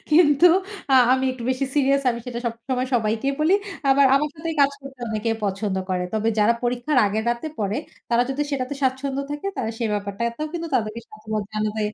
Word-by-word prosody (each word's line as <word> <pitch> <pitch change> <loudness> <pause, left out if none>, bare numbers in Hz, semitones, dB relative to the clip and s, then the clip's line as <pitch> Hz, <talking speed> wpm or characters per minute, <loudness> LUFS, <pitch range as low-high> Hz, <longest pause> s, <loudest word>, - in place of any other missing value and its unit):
কিন্তু 305 0 +6 0.5
আ - - +7 0.2
আমি 260 0 +2
একটু 255 -2 -9
বেশি 260 +1 0
সিরিয়াস, 275 -1 +3
আমি 235 0 -4
সেটা 240 -1 -4
সবসময় 240 +2 -2
সবাইকেই 225 +3 +1
বলি। 315 +4 +3 0.4
আবার 275 +1 +6
আমার 300 +2 +2
সাথেই 325 +1 -4
কাজ 280 0 +5
করতে 270 -1 -11
অনেকে 220 +1 -1
পছন্দ 200 0 -1
করে। 185 -1 0
তবে 220 0 0
যারা 210 +2 +5
পরীক্ষার 245 +4 +1
আগের 215 +2 -1
রাতে 240 +5 -3
পড়ে, 205 0 -1 0.3
তারা 235 0 +3
যদি 275 +2 -1
সেটাতে 265 0 -2
স্বাচ্ছন্দ্য 265 +1 0
থাকে, 295 +5 -4
তারা 220 - -2
সে 235 - -1
ব্যাপারটাতেও 210 +7 -2
কিন্তু 335 -1 -4
তাদেরকে 220 -1 -1
সাধুবাদ 215 0 -4
জানাতে 215 0 -2
245 Hz, 185 wpm, -23 LUFS, 215-275 Hz, 0.5 s, আ